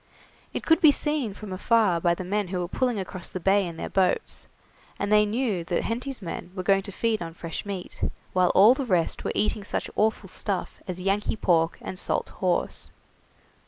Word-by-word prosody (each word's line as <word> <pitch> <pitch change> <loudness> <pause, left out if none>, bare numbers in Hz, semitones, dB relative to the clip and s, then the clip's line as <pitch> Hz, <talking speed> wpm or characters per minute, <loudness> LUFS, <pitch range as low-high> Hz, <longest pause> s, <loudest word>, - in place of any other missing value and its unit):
It - - -4
could 325 - +4
be 310 - +9
seen 285 -8 0
from 205 -3 -7
afar 200 -3 +2
by 170 0 +3
the 185 - -5
men 200 +2 -1
who 185 +1 -3
were 175 -1 -2
pulling 245 +4 0
across 185 -2 -5
the 185 - -5
bay 195 +1 +3
in 165 -1 -7
their - - -4
boats, 185 -2 0 0.5
and 200 +1 -2
they 210 0 +5
knew 215 -5 0
that 175 0 0
Henty's 245 0 -3
men 170 0 -5
were 185 - -3
going 195 +1 +4
to 200 - -7
feed 220 +1 0
on 165 -1 -6
fresh 165 +3 -6
meat, 195 -3 -6 0.3
while 185 -1 +4
all 210 +6 +8
the 275 - -3
rest 180 -9 0
were - - -1
eating 210 0 0
such - - -2
awful 215 -2 +1
stuff 190 +1 -3
as 185 -1 -4
Yankee 195 +4 0
pork 165 -5 +2
and 185 - -5
salt - - -1
horse. 180 -2 0
195 Hz, 200 wpm, -26 LUFS, 180-215 Hz, 0.5 s, be